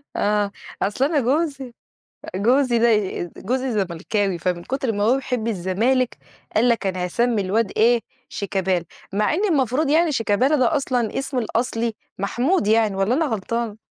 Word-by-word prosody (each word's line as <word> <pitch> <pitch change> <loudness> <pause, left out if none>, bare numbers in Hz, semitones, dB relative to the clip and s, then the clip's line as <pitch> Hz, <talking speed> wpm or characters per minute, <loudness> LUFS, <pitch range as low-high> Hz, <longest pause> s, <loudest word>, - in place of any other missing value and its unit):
آه، 205 -1 +1 0.3
أصل 230 +7 +1
أنا 300 -1 +2
جوزي 275 -1 -1 0.6
جوزي 240 +4 +3
دي 210 -6 +1
جوزي 255 +4 -1
زملكاوي، 195 -1 -1
فمن 175 0 -2
كُتر 265 -3 -2
ما 205 0 -2
هو 245 +5 +4
بيحب 250 -4 -3
الزمالك 225 +6 0 0.4
قال 235 +3 +4
لك 230 -4 +1
أنا 185 -1 -1
هاسمّي 230 +3 +1
الواد 205 +3 0
إيه 235 +2 +4 0.3
شيكابالا، 190 -3 -1 0.3
مع 210 +8 +1
إن 395 +5 0
المفروض 275 -1 +1
يعني 320 +1 +3
شيكابالا 250 +5 +2
ده 265 +4 +2
أصلًا 245 -5 -1
اسم 270 -1 -2
الأصلي 230 0 -1 0.2
محمود 240 - 0
يعني، 220 -2 +3
والّا 195 +5 +1
أنا 320 +4 +2
غلطانة؟ 225 -1 -2
230 Hz, 150 wpm, -22 LUFS, 205-260 Hz, 0.6 s, هو